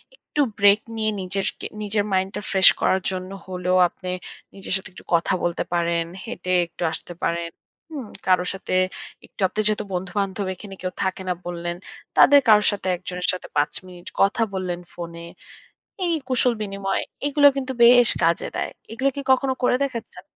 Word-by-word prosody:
একটু 295 - -3 0.2
ব্রেক 200 +1 +6 0.2
নিয়ে 215 -1 0
নিজেরকে 195 +1 -3 0.2
নিজের 205 0 0
mind 190 0 +1
টা - - -3
fresh 190 -1 +8
করার 190 - +2
জন্য 185 0 -5 0.2
হলেও, 180 0 0
আপনি 185 - -8 0.5
নিজের 195 -1 -5
সাথে 190 0 -3
একটু - - -13
কথা 165 +2 +1
বলতে 175 -1 0
পারেন, 170 -1 +1 0.2
হেঁটে 185 -6 -5 0.2
একটু 170 +1 -7
আসতে 170 +2 -6
পারেন। 170 0 -1 0.4
হুম? 275 -7 -6 0.2
কারো 180 -1 +4
সাথে 195 - -5 0.5
একটু - - -14
আপনি 190 - -6
যেহেতু 215 0 0
বন্ধুবান্ধব 195 +2 -2
এখানে 195 +1 -10
কেউ 185 0 -3
থাকে 190 0 -2
না - - +2
বললেন, 175 0 -4 0.4
তাদের 285 0 +8
কারো 210 -1 +7
সাথে 205 -2 -4
একজনের 180 0 -5
সাথে 185 - -6
৫ 145 0 +2 0.2
মিনিট 180 0 -13
কথা 200 +4 +3
বললেন 180 -2 -3
ফোনে। 170 -1 -7 0.8
এই 340 - +1
কুশল 250 -1 +2
বিনিময়, 195 -1 -2 0.2
এগুলোও 285 0 +6
কিন্তু 260 -1 -3
বেশ 245 0 +8
কাজে - - +2
দেয়। - - -2 0.2
এগুলো 260 +4 +1
কি 280 - -3
কখনো 260 0 +3
করে 250 - +4
দেখেচ্ছেন? 230 -9 -5
190 Hz, 170 wpm, -23 LUFS, 180-220 Hz, 0.8 s, fresh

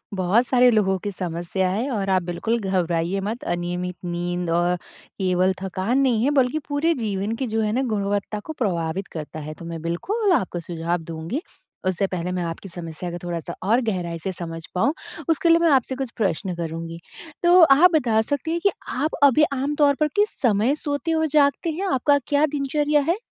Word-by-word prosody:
बहुत 190 +7 +2
सारे 250 0 +5
लोगों 190 -3 +2
की 205 - -2
समस्या 180 +1 -2
है। 225 +9 -1
और 195 -4 -1
आप 185 -1 +3
बिल्कुल 220 +7 -1
घबराइए 180 -1 0
मत 220 +5 -4
अनियमित 175 +1 -3
नींद 175 0 -2
और 175 +1 +2
केवल 185 +1 -1
थकान 195 +7 -1
नहीं 240 -4 +2
है 285 - +3
बल्कि 275 +2 +2
पूरे 310 +4 +2
जीवन 210 -3 -2
की 260 +1 -3
जो 220 0 0
है 210 -1 0
ना 260 - +1
गुणवत्ता 205 0 -1
को 315 +9 -7
प्रभावित 180 -3 -1
करता 155 -1 -6
है। 155 +1 -6
तो 170 - -11
मैं 165 -1 -6
बिल्कुल 390 - -1
आपको 180 - 0
सुझाव 170 0 -2
दूँगी। 165 - -4 0.5
उससे 185 +1 +1
पहले 180 -1 -3
मैं 180 -1 -2
आपकी 170 +3 -5
समस्या 170 0 -6
को 175 - -5
थोड़ा-सा 170 -1 -4
और 230 +6 +3
गहराई 170 -5 -2
से 190 +4 -3
समझ 165 -2 -6
पाऊँ 275 - +2 0.4
उसके 330 +1 +2
लिए 335 - +7
मैं 335 -1 +4
आपसे 260 -1 +2
कुछ 265 -3 -4
प्रश्न 190 -3 -1
करुँगी। 165 0 -5 0.4
तो 350 +1 +7
आप 320 +4 +7
बता 230 -7 +3
सकती 285 +6 -2
हैं 340 - 0
कि 400 - +5 0.2
आप 295 +5 -1
अभी 285 +2 +6
आम 275 +2 -1
तौर 290 -2 +4
पर 305 - +3
किस 415 +1 +3
समय 235 +3 +3
सोते 300 +2 -2
और 320 0 +1
जागते 290 +2 +2
हैं? 370 +6 -3
आपका 285 +3 +3
क्या 290 +1 +3
दिनचर्या 295 +1 +1
है? 355 - +2
205 Hz, 195 wpm, -23 LUFS, 175-280 Hz, 0.5 s, लिए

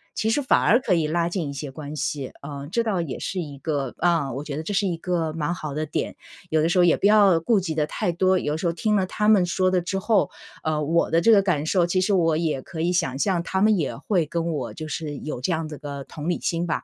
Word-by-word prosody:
其 220 - 0
实 280 +6 +1
反 260 - +3
而 235 - +4
可 230 -7 0
以 165 -3 +2
拉 170 +2 0
近 170 -4 -3
一 140 - -5
些 140 0 -6
关 150 +2 -7
系。 140 -3 -3 0.2
嗯， 140 -1 -7
这 235 +4 +1
倒 200 -6 0
也 145 -6 -4
是 190 - -4
一 145 -4 -7
个 140 -3 -3
嗯， 165 -7 +1
我 140 - -4
觉 150 -2 -5
得 - - -2
这 160 - -5
是 205 +1 +1
一 175 - -1
个 165 -2 -1
蛮 165 +2 -2
好 155 -4 -6
的 155 0 -2
点， - - -3 0.4
有 155 - +3
的 160 - +2
时 180 - +1
候 180 - +6
也 175 - +5
不 - - +2
要 205 -5 +5
顾 205 +5 +2
及 170 -4 -3
得 155 -1 0
太 175 - -1
多， 185 +2 +2
有 150 -3 -1
时 170 +2 -2
候 170 - 0
听 210 +5 0
了 190 -2 +1
她 210 +2 -1
们 210 -4 +6
说 185 +1 +1
的 185 -1 +2
之 195 +3 -3
后， 200 +1 +2 0.3
呃， 155 -1 0
我 165 +3 +1
的 165 - +3
这 225 +7 +4
个 205 - +7
感 165 -6 0
受， 175 +1 +2
其 185 +2 +1
实 195 +3 +1
我 165 -4 +3
也 155 -5 -1
可 160 - -9
以 170 +2 +1
想 135 -6 0
象， 180 +2 +1
她 190 +3 -2
们 215 +1 +4
也 160 -7 -2
会 175 +4 0
跟 170 +1 -2
我 150 - -3
就 155 -1 -6
是 150 -2 -4
有 150 -5 -5
这 175 - 0
样 160 -1 -1
子 150 -2 -8
个 140 -2 -6
同 155 +4 -6
理 175 - 0
心 170 +1 -1
吧。 165 - -2
170 Hz, 305 characters per minute, -24 LUFS, 150-185 Hz, 0.4 s, 个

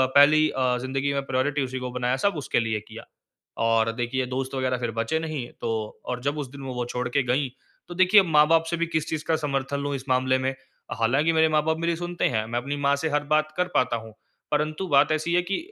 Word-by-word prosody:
पहली 155 +2 +6
अ, 130 -2 0
ज़िंदगी 135 +2 -2
में 140 - 0
प्रायोरिटी 135 +2 0
उसी 130 0 -5
को 125 0 -4
बनाया, 125 0 0
सब 200 - +1
उसके 140 - 0
लिए 110 -2 -1
किया। - - -10 0.6
और 115 0 +3
देखिए 120 +2 -2
दोस्त 130 +1 -4
वगैरह 130 -1 0
फिर 120 -1 -2
बचे 115 +8 -1
नहीं 155 -6 -4
तो 115 - -2 0.4
और 125 -1 -3
जब 140 +3 -1
उस 145 -3 -4
दिन 140 +1 -11
वो 130 -1 -5
वो 125 0 -2
छोड़ 125 +1 -3
के 140 +3 +1
गई 130 +3 0 0.4
तो 175 - -7
देखिए 185 +3 +6
माँ-बाप 160 -1 +4
से 170 - 0
भी 170 0 0
किस 160 -2 -2
चीज़ 155 -1 -3
का 160 - +2
समर्थन 140 -2 -2
लूँ 145 0 -2
इस 135 -1 -5
मामले 130 0 +2
में? 130 +1 -1 0.4
हालाँकि 135 +8 +2
मेरे 160 0 +4
माँ-बाप 155 +1 +1
मेरी 170 +1 0
सुनते 175 +1 -3
हैं 110 -3 -1
मैं 120 +2 -2
अपनी 140 +4 -4
माँ 140 0 +2
से 160 +3 -2
हर 150 0 0
बात 155 0 +2
कर 180 0 +1
पाता 125 -1 +2
हूँ। 110 -1 -9 0.4
परंतु 155 +5 0
बात 145 0 +4
ऐसी 155 +2 0
है 180 - +3
कि, 195 +2 -2
140 Hz, 235 wpm, -25 LUFS, 125-155 Hz, 0.6 s, पहली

